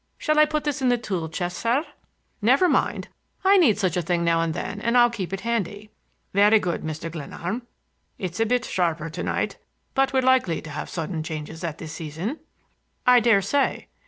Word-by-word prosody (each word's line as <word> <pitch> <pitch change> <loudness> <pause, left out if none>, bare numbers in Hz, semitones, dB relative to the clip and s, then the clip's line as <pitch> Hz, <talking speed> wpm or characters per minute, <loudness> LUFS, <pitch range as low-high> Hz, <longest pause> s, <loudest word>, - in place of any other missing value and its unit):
Shall 305 0 +1
I 305 - +8
put 305 0 -2
this 290 -2 -2
in 255 - +3
the 245 - +3
tool 185 -8 -3
chest, 175 +2 -3
sir?" 250 +7 +1 0.6
"Never 265 - +4
mind. - - 0 0.4
I 395 +1 +7
need 270 - +5
such 190 -4 0
a 180 - +1
thing 170 +1 0
now 165 -1 +2
and 165 -1 -1
then 205 +3 -4
and 235 +2 +2
I'll 240 -1 +6
keep 190 -6 -4
it 195 0 -4
handy." 210 -2 -3 0.4
"Very 205 +3 +6
good, 175 -4 -2
Mr. 160 +1 -5
Glenarm. 175 - -5 0.5
It's 185 0 -5
a 225 - +2
bit 250 +2 +1
sharper 165 -3 -1
to 165 - -5
night, - - -2 0.3
but 270 -1 +2
we're 260 -1 +2
likely 255 -10 +3
to 155 - -8
have 150 - -5
sudden 165 -1 -3
changes 160 +1 -6
at 165 -2 -3
this 160 -2 -8
season." 165 - -5 0.7
"I 250 0 +7
dare 225 -4 +4
say." 275 +8 0
200 Hz, 200 wpm, -24 LUFS, 165-245 Hz, 0.7 s, I